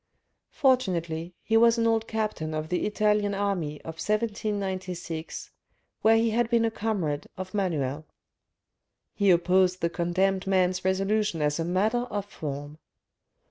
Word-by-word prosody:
Fortunately, 175 - 0
he 225 - 0
was 230 +1 +5
an 230 - +1
old 225 -1 +2
captain 210 -8 -2
of 155 0 -3
the 180 - 0
Italian 210 -1 +1
army 180 -7 -2
of 160 0 -8
1796, 190 -6 -3 0.5
where 225 +1 +5
he 225 0 +2
had 235 +1 +1
been 235 -1 +3
a 225 - 0
comrade 195 -10 -2
of 185 +1 -6
Manuel. 155 -7 -1 1.1
He 200 -2 +2
opposed 185 +1 +3
the 170 0 0
condemned 185 +2 0
man's 185 -1 +2
resolution 195 0 +1
as 150 +1 0
a 165 - 0
matter 215 +8 +1
of 205 -3 -3
form. 145 -4 -6
190 Hz, 140 wpm, -27 LUFS, 170-215 Hz, 1.1 s, was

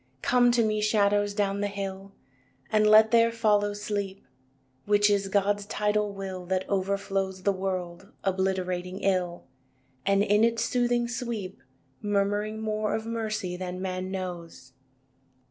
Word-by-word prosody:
III - - -40
Come 245 -1 +4
to 235 -1 +3
me, 215 -1 0
shadows, 205 -1 +2
down 200 -1 0
the 205 - +1
hill 195 -1 -6 0.6
And 215 -1 +4
let 215 +1 +7
there 230 -1 +5
follow 210 -3 +2
Sleep, 205 -2 -4 0.6
Which 205 0 +4
is 200 -1 +1
God's 200 +1 +1
tidal 210 0 0
Will 190 -2 -6
That 190 0 -1
overflows 195 -1 -1
The 200 - +3
world 185 0 -4
obliterating 185 -1 -1
ill, 180 -3 0 0.6
And 200 +4 +3
in 210 +1 +3
its 230 0 +2
soothing 240 0 +1
sweep 235 -5 -5 0.4
Murmuring 205 +1 0
more 215 -1 -1
of 220 - -4
mercy 215 -5 -3
than 180 0 -5
man 185 0 -3
knows. 175 -8 -6
200 Hz, 140 wpm, -27 LUFS, 190-215 Hz, 0.6 s, let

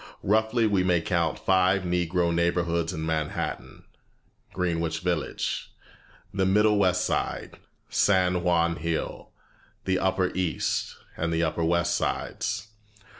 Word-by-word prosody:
Roughly 110 +3 +2
we 100 -4 +2
may 90 -2 +3
count 85 -1 0
five 95 +1 +2
Negro 90 -1 0
neighborhoods 85 -1 +1
in 80 0 -4
Manhattan: 80 -2 -3 0.7
Greenwich 85 -3 -1
Village, 90 -3 -2 0.6
the 95 0 0
middle 105 +2 +4
West 95 -3 +2
Side, - - -2 0.3
San 90 -3 +2
Juan 85 -1 +2
Hill, 85 0 -3 0.6
the 95 -1 +1
upper 95 -1 +1
East, 90 -3 -1 0.2
and 85 +1 -2
the 80 0 +1
upper 85 +1 -1
West 85 +1 +2
sides. 105 - -2
90 Hz, 120 wpm, -26 LUFS, 85-95 Hz, 0.7 s, middle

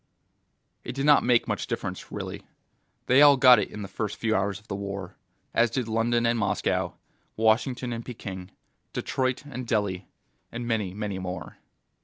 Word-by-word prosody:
It - - -5
did 135 0 -1
not 145 -1 +6
make 120 -1 +3
much - - -2
difference, - - -5
really. - - -5 0.6
They 130 +3 +5
all 145 -1 +8
got 125 -2 +8
it - - -2
in 105 - -7
the - - -5
first 105 +2 -4
few 110 -1 0
hours 95 -1 0
of 105 - -25
the 100 - -3
war; 100 -2 -5 0.4
as 120 0 +4
did 120 +1 -2
London 115 +1 +1
and 115 0 +2
Moscow, 100 -3 0 0.4
Washington 120 +3 +1
and 115 0 -5
Peking, 95 -7 -7 0.4
Detroit 130 0 -1
and 130 -3 -6
Delhi, 100 -4 -1 0.4
and 120 0 -5
many, 105 -5 -1
many 105 -2 -3
more. 90 0 -6
115 Hz, 170 wpm, -27 LUFS, 100-125 Hz, 0.6 s, all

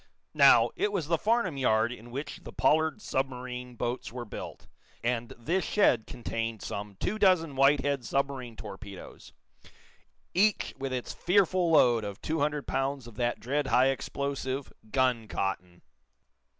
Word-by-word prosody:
Now, - - +6
it 210 - 0
was 190 -7 -1
the 165 0 +2
Farnum 215 -9 +1
yard 115 -3 +2
in 120 -1 -10
which 135 +5 -6
the - - -9
Pollard 160 +6 +2
submarine 125 -2 -3
boats 120 +1 -3
were 120 0 -6
built, 105 - -8 0.4
and 120 -1 -1
this 170 +11 0
shed 130 - +2
contained 115 -2 -4
some 100 0 -5
two 210 - -2
dozen 180 -7 +3
Whitehead 140 0 +3
submarine 135 -2 -2
torpedoes, 100 -2 -10 1.0
each 205 +3 +2
with 135 0 -3
its 125 -1 -3
fearful 185 -1 +2
load 120 -8 +5
of 100 -1 -6
two 160 +1 -2
hundred 150 0 0
pounds 135 -1 -2
of 120 - -11
that 120 -1 0
dread 140 +3 -1
high 130 +1 +4
explosive, 135 0 -3 0.2
guncotton. 105 -8 -1
130 Hz, 140 wpm, -29 LUFS, 120-150 Hz, 1.0 s, Now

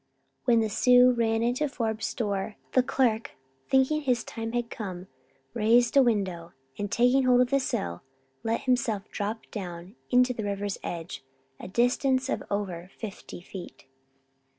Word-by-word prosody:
When 235 -2 +4
the 220 - +1
Sioux 250 +4 +5
ran 225 -2 +1
into 255 +5 0
Forbes 225 -4 -2
store, 205 -2 -2 0.2
the 255 - +4
clerk, 240 -3 0 0.4
thinking 265 +3 +3
his 250 -5 +1
time 225 0 -6
had 240 -1 -2
come, 185 -4 -6 0.5
raised 235 +3 +3
a 275 - +8
window 190 -8 0 0.2
and 205 -1 -4
taking 250 +2 +3
hold 250 -1 +5
of 250 - +1
the 275 - +4
sill, 85 - -3 0.4
let 225 +1 -1
himself 235 -5 0
drop 215 +2 -3
down 180 -1 -7
to 250 0 +4
the 225 - -5
river's 200 0 -3
edge, 165 -4 -6 0.4
a - - -7
distance 255 +5 +1
of - - -1
over 185 -4 -3
fifty 205 -4 -8
feet. 180 0 -10
225 Hz, 150 wpm, -27 LUFS, 200-250 Hz, 0.5 s, a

